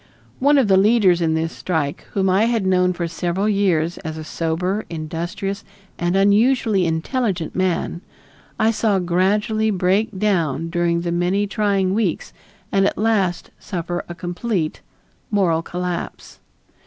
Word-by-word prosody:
One 285 +2 +4
of 265 -5 +3
the 190 -1 +5
leaders 195 -4 +4
in 160 -1 +1
this 160 +1 -1
strike, 160 -5 -2
whom 195 -1 +1
I 190 +4 +3
had 230 -4 0
known 180 -1 +3
for 175 -1 -3
several 175 +4 -1
years 180 -5 +1
as 160 -3 -6
a 155 - -6
sober, 175 +6 -2
industrious, 170 +5 -4 0.4
and 175 +1 0
unusually 205 -1 +3
intelligent 175 - -2
man, 180 -2 -1 0.6
I 220 - +3
saw 215 -2 +1
gradually 205 +5 +1
break 195 +2 +1
down 165 -6 0
during 170 -1 +1
the 170 0 -2
many 180 +4 +1
trying 200 -2 0
weeks 205 -5 -1 0.4
and 195 0 +3
at - - -2
last 205 -5 0
suffer 175 -1 -4
a 175 - -6
complete 175 0 -3 0.5
moral 180 -6 +2
collapse. 180 +1 -5
185 Hz, 140 wpm, -21 LUFS, 170-205 Hz, 0.6 s, the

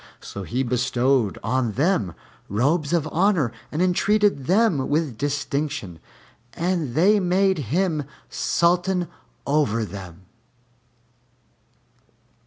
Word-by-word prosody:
So 100 - -8
he 120 +8 -2
bestowed 125 -2 +1
on 120 0 0
them 130 - +1 0.3
robes 145 - +1
of 165 -3 +1
honor 175 - +2 0.2
and 155 +4 0
entreated 195 -4 +2
them 185 - +2
with 150 -4 0
distinction, 140 - -3 0.5
and 170 -7 -1
they 205 +6 +5
made 190 0 +2
him 160 -2 0 0.2
Sultan 180 +1 +1 0.4
over 140 -7 +1
them. 95 -3 -10
150 Hz, 95 wpm, -23 LUFS, 120-180 Hz, 0.5 s, they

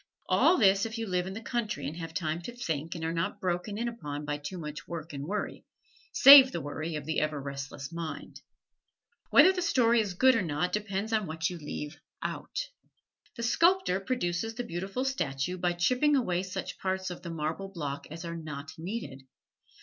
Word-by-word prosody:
All 365 - +4
this 195 -2 +4
if 225 +1 -6
you 225 - -2
live 180 -2 -1
in 190 - -5
the 225 - -7
country 215 - -2
and 145 +3 -4
have 165 -1 -6
time 160 0 -2
to 240 +8 -8
think 165 - -3
and 165 -1 -4
are 165 - -1
not 165 0 -2
broken 185 +3 -2
in 235 +2 -1
upon 150 -11 -5
by 145 0 -2
too 145 +6 -6
much 155 -1 -7
work 160 -2 -6
and 140 +1 -5
worry 205 +3 -3 0.5
save 275 -1 +10
the 170 - -3
worry 155 +2 -4
of 150 -2 -5
the 160 +1 0
ever 155 -1 -1
restless 140 +1 -6
mind. 165 -1 -6 0.9
Whether 375 - +7
the 365 - -2
story 240 -8 +3
is 200 -4 -4
good 260 +6 +5
or 230 - +2
not 160 0 -1
depends 210 +1 -2
upon 215 -3 +1
what 160 +2 -2
you 175 - -7
leave 150 -1 -6 0.3
out. - - -4 0.7
The 235 - -4
sculptor 335 - +3
produces 225 -1 -2
the 245 - -3
beautiful 195 +7 -3
statue 180 - -2
by 175 0 +1
chipping 255 +12 +3
away 185 -10 +1
such 185 -1 -5
parts 190 -1 -2
of 175 - -8
the 175 - -7
marble 165 +4 -3
block 145 -6 -5
as 165 +3 -7
are 170 0 -4
not 155 -2 -7
needed. 175 - -5
175 Hz, 195 wpm, -29 LUFS, 155-225 Hz, 0.9 s, save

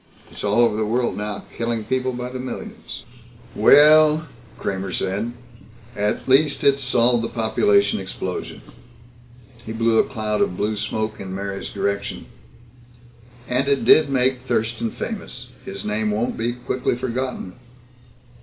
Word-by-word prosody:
It's - - -8
all 105 +2 +2
over 115 -3 +3
the 110 - 0
world 120 +3 0
now 105 0 -4
killing 115 -1 -2
people 130 +2 -1
by 125 0 -5
the 130 - -5
millions." 130 0 -7 0.5
"Well," 155 +1 +6 0.3
Kramer 95 -1 -3
said, 100 +6 -1 0.6
"at 105 0 -1
least 140 +2 +3
it's 140 0 +3
solved 120 -2 +3
the 115 - -2
population 105 -3 +2
explosion." 95 -1 -5 1.0
He 110 - -6
blew 115 0 +2
a - - +6
cloud 110 -4 -1
of 90 - 0
blue 105 +1 0
smoke 110 +1 -3
in 95 -1 -6
Mary's 100 0 -4
direction. 100 0 -3 1.2
"And 130 +2 0
it 140 -1 +1
did 155 -2 +6
make 130 -1 +2
Thurston 115 -2 -1
famous. - - -6 0.2
His 95 0 -6
name 105 +1 0
won't 110 +3 -1
be 115 +2 -1
quickly 125 0 -2
forgotten." 125 -5 -3
115 Hz, 140 wpm, -22 LUFS, 105-130 Hz, 1.2 s, Well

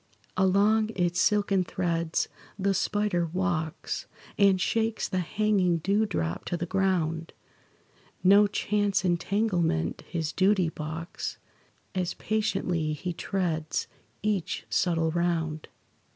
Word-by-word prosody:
Along 205 +4 +3
its 175 -1 +1
silken 200 -3 +3
threads 170 -2 -1 0.3
the 195 0 +1
spider 195 -2 0
walks, 170 -2 -2 0.3
And 195 -2 +4
shakes 225 +3 0
the 185 - -1
hanging 190 -1 +2
dew 200 +6 +1
drop 85 - -2
to 175 - -2
the 175 - -2
ground; 170 -3 0 0.9
No 200 +2 +7
chance 205 -1 0
entanglement 175 - 0
his 160 -3 -2
duty 190 -2 +3
balks, 160 +2 -5 0.6
As 180 -1 -1
patiently 180 -7 0
he 175 +4 -4
treads 165 -4 -1 0.4
each 200 -5 -1
subtle 165 -3 +2
round. 165 -2 -1
180 Hz, 110 wpm, -28 LUFS, 165-200 Hz, 0.9 s, No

